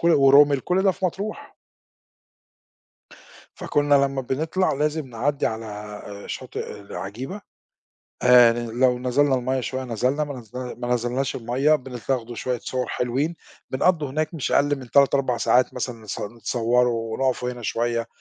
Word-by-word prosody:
كُلّ 170 - +3
وروميل، 140 0 +6
كُلّ 180 +7 +1
ده 195 - +4
في 190 - -6
مطروح. 210 - -4 2.0
فكُنّا 145 0 +2
لمّا 140 -1 +2
بنطلع 160 +8 0
لازم 150 +1 -1
نعدِّي 135 +4 -1
على 105 -2 -5 0.3
شاطئ - - -6
العجيبة، 105 - -7 0.8
آآ 125 -2 +7
لو 120 +2 +1
نَزلنَا 130 +2 +2
المَيّة 130 +1 -1
شويّة 130 +1 -3
نزَلنَا، 125 +5 0
ما 145 -1 -5
نز 110 -3 -16
ما 125 -1 -5
نزلناش 125 +3 -1
المَيّة 130 +6 +2
بنتاخدوا 125 -3 -4
شويّة 125 +1 -2
صور 125 +2 -3
حلوين، 135 +7 -1 0.3
بنقضوا 155 +1 +1
هناك 155 +4 -2
مش 155 -5 -3
أقل 145 +1 +3
من 130 -2 -11
3، 140 0 +5
4 130 -3 0
ساعات 125 +2 +3
مثلًا 120 -3 -5 0.2
ن 120 - -18
نتصوروا 115 -1 0
ونُقفوا 125 0 0
هنا 125 -1 -9
شويّة، 115 +1 -1
130 Hz, 140 wpm, -23 LUFS, 120-145 Hz, 2.0 s, آآ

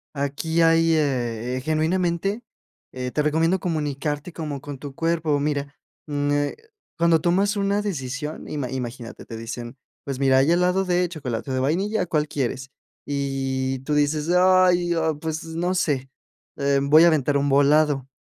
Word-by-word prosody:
Aquí 145 +4 -1
hay, 165 0 +4
eh, 125 -4 -1
genuinamente, 170 - 0 0.5
eh, 125 -1 -4
te 150 - 0
recomiendo 160 +5 +2
comunicarte 150 -1 -3
como 150 -5 -5
con 145 -1 -7
tu 140 -2 -8
cuerpo. 165 -2 0
Mira, 145 0 -2 0.3
mm, 145 -1 -1
eh, 145 0 0 0.4
cuando 165 -1 +3
tomas 195 +5 +2
una 200 +1 +1
decisión 150 -5 -4
ima 140 -4 -4
imagínate, 120 -2 -6
te 115 - -8
dicen: 120 +2 -7 0.3
"Pues, 135 -2 -4
mira, 135 -1 +4
hay 140 +5 +3
helado 180 +2 +2
de 180 0 +1
chocolate 135 -6 -5
o - - -1
de 130 - 0
vainilla, 180 +10 0
¿cuál 155 -2 0
quieres?". 135 -1 -3 0.4
Y 135 -2 -2
tú 150 +3 -3
dices: 150 +1 +1
"Ay, 180 -1 +4
ah, 160 -1 +1
pues 160 +1 -4
no 170 +3 -2
sé, 140 -7 0 0.5
em, 140 0 +1
voy 155 +3 +8
a - - +7
aventar 145 -3 +2
un 140 0 0
volado". 145 -1 +3
150 Hz, 160 wpm, -23 LUFS, 135-170 Hz, 0.5 s, voy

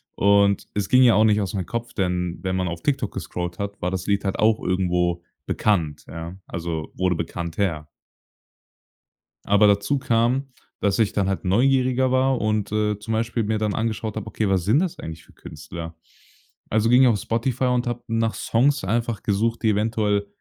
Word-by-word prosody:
Und 100 0 +3
es 100 -1 -1
ging 130 0 +6
ja 120 - +6
auch 110 - +5
nicht 105 -1 +3
aus 95 -1 -3
mein 95 -3 -2
Kopf, 120 +3 -5
denn 90 -3 -1
wenn 95 0 -1
man 95 -1 0
auf 85 -1 -5
TikTok 130 -6 -1
gescrollt 90 +1 -5
hat, 100 0 -5
war 90 - -1
das 95 -1 -4
Lied 100 -1 +1
halt 95 - -2
auch 110 0 +3
irgendwo 90 -1 0 0.2
bekannt, 80 -8 0
ja. 85 +3 -7
Also 85 -2 -4
wurde 90 -2 +1
bekannter. 85 -1 -3 1.6
Aber 100 +1 +5
dazu 100 +7 +2
kam, 125 +2 +1 0.3
dass 100 +1 +1
ich 110 -1 +2
dann 100 -2 +1
halt 95 - -2
neugieriger 130 +5 +2
war 130 0 +2
und, 105 -1 -1
äh, 105 -1 0
zum 110 +2 -4
Beispiel 115 +1 -1
mir 110 +1 0
dann 105 -1 -1
angeschaut 110 -1 -2
habe: 110 - -5
„Okay, 110 - -1
was 95 -2 +1
sind 110 - +3
das 180 -1 -2
eigentlich 80 0 -8
für - - -21
Künstler?“ 80 +2 -9 0.7
Also 110 +1 +2
ging 125 +2 +6
auf 110 -4 +2
Spotify 120 +4 -1
und 125 0 +1
habe 120 0 -3
nach 115 0 0
Songs 135 +5 +1
einfach 115 +3 -1
gesucht, 115 +3 0
die 110 - +3
eventuell 105 -1 0
105 Hz, 185 wpm, -23 LUFS, 90-115 Hz, 1.6 s, ging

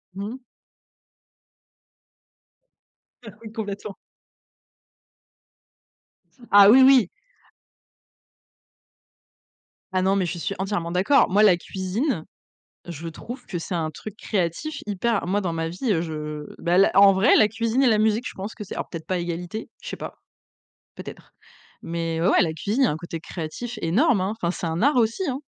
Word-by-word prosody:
Mmh. 215 +7 -6 2.9
Ah, 210 0 -11
oui, 215 - -9
complètement. 205 -2 -6 2.6
Ah, 200 -1 +9
oui, 260 +4 +8
oui. 260 -8 +6 2.9
Ah, 185 - +2
non, 190 +1 +2
mais 190 - +1
je 175 0 -4
suis 200 +4 -3
entièrement 190 -3 -3
d'accord. 195 +11 +3
Moi, 205 +3 +4
la 185 -4 +6
cuisine, 190 - -3 0.6
je 165 -1 -7
trouve 235 +10 -8
que 180 - -4
c'est 170 +2 -5
un 160 -2 -1
truc 210 +6 -9
créatif, 210 - -3
hyper 210 +1 -1
moi, 200 +4 0
dans 175 -4 -2
ma 165 0 -2
vie, 185 +8 -2
heu, 165 -4 +1
je 150 -2 -5 0.2
bah, 175 +1 +1
l 195 +2 +5
en 195 0 +7
vrai, 195 +7 +4
la 215 - +6
cuisine 230 +4 -1
et 265 - +4
la 220 - +4
musique, 220 +3 +1
je - - -7
pense 200 +3 -6
que 215 - -8
c'est 200 - -8
alors, - - -4
peut-être 165 -2 -8
pas 185 - -1
à - - 0
égalité, 175 +5 -5
je - - -7
sais - - -5
pas. - - -8 0.8
Peut-être, - - -11 0.5
mais 165 -1 -3
ouais, 170 - +2
ouais, 200 - +4
la 165 -4 +1
cuisine, 210 - -2
il - - +6
y - - +3
a - - +1
un 150 - -3
côté 165 0 -7
créatif 215 +9 -6
énorme, 210 - +2
hein, 190 +2 -1
enfin, 170 0 0
c'est 180 - -5
un 165 +1 -2
art 285 +3 +3
aussi, 230 +9 +1
hein? 265 +2 -4
195 Hz, 170 wpm, -24 LUFS, 170-220 Hz, 2.9 s, Ah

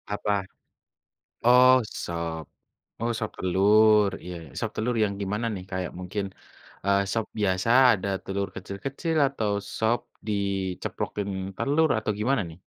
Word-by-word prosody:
Apa? 105 - -2 1.2
Oh, 125 +1 +8 0.3
sop. 85 -1 -4 0.6
Oh, 115 +1 0
sop 110 - -2
telur, 105 +3 +5
iya. 90 0 -6 0.2
Sop - - -1
telur 120 +2 -1
yang 100 -1 0
gimana 105 +4 -2
nih? 90 - -6
Kayak 90 -1 -3
mungkin, 100 +2 -3 0.6
eee, 100 0 +4
sop 115 0 0
biasa 95 +1 +1 0.3
ada 100 +1 -4
telur 100 0 -2
kecil-kecil, 135 - -3
atau 110 -7 -2 0.3
sop 110 +2 +2 0.3
diceplokin 100 0 -2 0.3
telur, 155 +3 +2
atau 110 - -1
gimana, 125 +1 +2
nih? 80 +2 -13
105 Hz, 125 wpm, -26 LUFS, 95-115 Hz, 1.2 s, Oh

